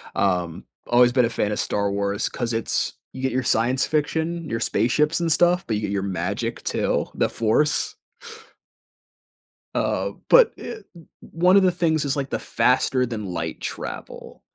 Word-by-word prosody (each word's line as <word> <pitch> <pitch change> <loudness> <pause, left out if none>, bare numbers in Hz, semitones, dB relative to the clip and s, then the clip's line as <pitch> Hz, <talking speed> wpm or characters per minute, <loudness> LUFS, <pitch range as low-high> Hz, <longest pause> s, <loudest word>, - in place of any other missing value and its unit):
Um, 90 -4 -1 0.2
always 120 0 +5
been 125 -2 +3
a - - -1
fan 105 -2 -1
of - - -2
Star 100 -1 0
Wars 100 +2 -1
'cause 120 -2 -3
it's 115 - -1 0.2
you 130 - -7
get 130 - 0
your 130 +1 -1
science 120 +4 +2
fiction, 160 +2 -1
your 115 - -2
spaceships 150 +10 +1
and 165 -1 0
stuff, 175 +2 +3
but 110 - 0
you 105 - -2
get 100 -1 -3
your 100 -1 -1
magic 95 -2 -3
too, - - 0
The - - +1
Force. 115 +7 +1 1.8
Uh, - - 0 0.2
but, - - +7
eh, 445 - -7 0.2
o 165 - -15 0.2
one 180 +3 +2
of 195 - +5
the 185 - +4
things 165 -3 +1
is, 140 0 -1
like, 135 -1 -3
the - - -2
faster-than-light 115 -5 0
travel. - - -7
125 Hz, 165 wpm, -23 LUFS, 110-160 Hz, 1.8 s, but